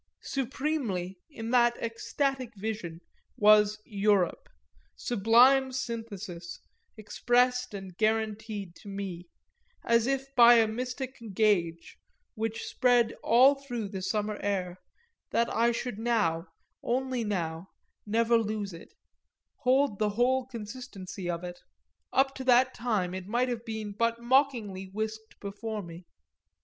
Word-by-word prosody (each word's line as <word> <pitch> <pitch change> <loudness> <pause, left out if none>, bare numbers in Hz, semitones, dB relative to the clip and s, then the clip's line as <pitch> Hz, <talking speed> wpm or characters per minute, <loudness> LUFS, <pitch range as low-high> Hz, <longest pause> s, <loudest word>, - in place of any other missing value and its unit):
Supremely, 255 - -2
in 230 -6 -6
that 240 -1 +4
ecstatic 255 +2 -2
vision, 195 -5 -5 0.4
was 210 0 +5
"Europe," 205 - +1 0.5
sublime 245 +4 +4
synthesis, 210 -9 -6 0.4
expressed 245 +2 +1
and 190 -2 -8
guaranteed 215 -2 -1
to - - -15
me 195 -3 -6 0.6
as 235 0 +3
if 270 0 -2
by 240 -1 +8
a 225 -1 +5
mystic 250 +3 -5 0.2
gage, 175 -6 +1 0.3
which 225 0 -3
spread 245 -2 +2
all 255 +5 +6
through 245 -7 -5
the 190 -2 -5
summer 210 +2 -2
air, 185 -3 -2 0.5
that 235 - 0
I 235 +1 +3
should 235 -2 -4
now, 210 -8 0 0.3
only 255 0 -1
now, 175 -4 -3 0.4
never 230 +2 +2
lose 210 -3 -3
it, 165 - -13 0.6
hold 265 -4 +2
the 215 -1 +2
whole 255 +1 +2
consistency 210 -6 -7
of 170 0 -3
it: 175 0 -7 0.5
up 270 +1 +2
to 265 - -5
that 255 +1 +5
time 210 -7 -1
it 185 0 -6
might 245 +4 +1
have 235 -2 -3
been 220 -2 -5
but 230 +3 0
mockingly 235 -6 +1
whisked 220 +3 -6
before 210 +1 -5
me. 170 +1 -10
220 Hz, 125 wpm, -29 LUFS, 200-245 Hz, 0.6 s, by